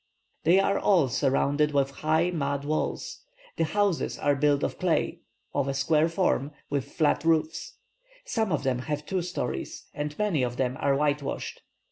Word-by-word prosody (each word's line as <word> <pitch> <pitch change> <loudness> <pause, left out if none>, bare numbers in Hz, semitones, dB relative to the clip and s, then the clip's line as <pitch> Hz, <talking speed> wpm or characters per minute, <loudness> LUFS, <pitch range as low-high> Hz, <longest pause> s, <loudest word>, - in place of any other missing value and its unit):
They 175 +4 +6
are 195 0 +2
all 175 -10 +3
surrounded 145 +3 +1
with 140 -1 +2
high 160 +5 +1
mud 140 -4 -2
walls; 155 +1 -2 0.4
the 165 - +2
houses 200 +1 0
are 145 - +2
built 145 0 +2
of - - -2
clay, 180 -3 0 0.3
of 140 -1 0
a 135 - -1
square 155 +3 +3
form, 165 -5 0 0.2
with 140 -1 -2
flat 155 -1 +2
roofs; 160 -1 0 0.5
some 220 -4 -1
of 155 -3 0
them 130 -2 0
have 150 +3 -3
two 190 +2 -1
stories, 170 - -4
and 150 0 -4
many 205 -9 +1
of 125 -1 -1
them 130 -1 0
are 140 - +3
whitewashed. 145 0 -1
150 Hz, 165 wpm, -27 LUFS, 140-165 Hz, 0.5 s, They